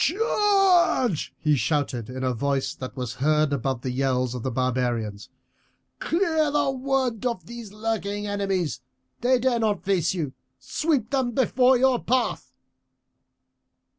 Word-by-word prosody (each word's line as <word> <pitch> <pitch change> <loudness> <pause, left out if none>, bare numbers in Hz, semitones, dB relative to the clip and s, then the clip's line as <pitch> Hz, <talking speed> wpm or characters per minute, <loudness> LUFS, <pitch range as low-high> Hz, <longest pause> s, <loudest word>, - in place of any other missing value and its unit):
"Charge!" 385 - +2
he 150 -1 +2
shouted 135 -5 -1
in 130 +1 -5
a 130 -1 +1
voice 140 +3 -1
that 130 - -8
was 125 -2 -3
heard 150 0 +2
above 135 -3 -2
the 130 - -3
yells 130 -1 0
of 125 - -5
the 130 - -2
barbarians. 120 -5 -2 0.7
"Clear 330 -8 +1
the 290 -1 +1
wood 260 -3 -1
of 235 -9 -2
these 235 -2 -9
lurking 210 -1 -3
enemies, 190 - -1 0.4
they 255 +2 +3
dare 245 -1 +1
not 215 -2 0
face 190 -3 +1
you. 150 -7 -3 0.2
Sweep 275 - -1
them 260 -3 0
before 255 +1 +3
your 255 -1 +2
path." 255 0 0
205 Hz, 135 wpm, -25 LUFS, -, 0.7 s, they